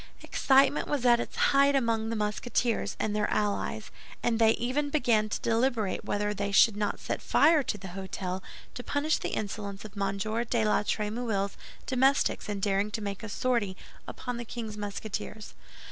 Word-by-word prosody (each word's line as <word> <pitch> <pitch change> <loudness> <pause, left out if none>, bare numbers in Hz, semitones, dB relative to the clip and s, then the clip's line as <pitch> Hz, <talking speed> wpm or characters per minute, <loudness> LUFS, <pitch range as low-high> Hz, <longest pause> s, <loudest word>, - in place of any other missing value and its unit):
Excitement 275 +2 +3
was 280 -4 -1
at 240 -1 +6
its - - -5
height 280 0 +4
among 230 -4 +1
the 230 - -2
Musketeers 220 +2 -1
and 210 -1 -1
their 210 - +1
allies, 210 -1 -1 0.3
and 235 -1 +1
they 225 -1 +6
even 275 +5 -1
began 235 -7 +2
to - - -2
deliberate 230 -3 0
whether 210 0 -1
they 200 0 -2
should 200 +2 +6
not 205 -1 -2
set - - -3
fire 310 +1 +4
to 235 - -3
the 190 -1 -8
hôtel 190 0 -5 0.3
to 245 - -7
punish 290 +4 0
the - - -3
insolence 205 -1 -5
of 210 -1 -10
M. 200 -1 -1
de 225 +2 0
la 210 - +3
Trémouille's 210 -1 -1 0.3
domestics 265 -3 +2
in 205 -1 -2
daring 200 +1 +1
to 220 +1 -3
make 200 -2 -4
a 220 - -6
sortie 215 -4 0 0.3
upon 245 -1 -5
the 240 - -4
king's 225 -2 -6
Musketeers. 210 +1 -5
220 Hz, 175 wpm, -29 LUFS, 205-245 Hz, 0.3 s, at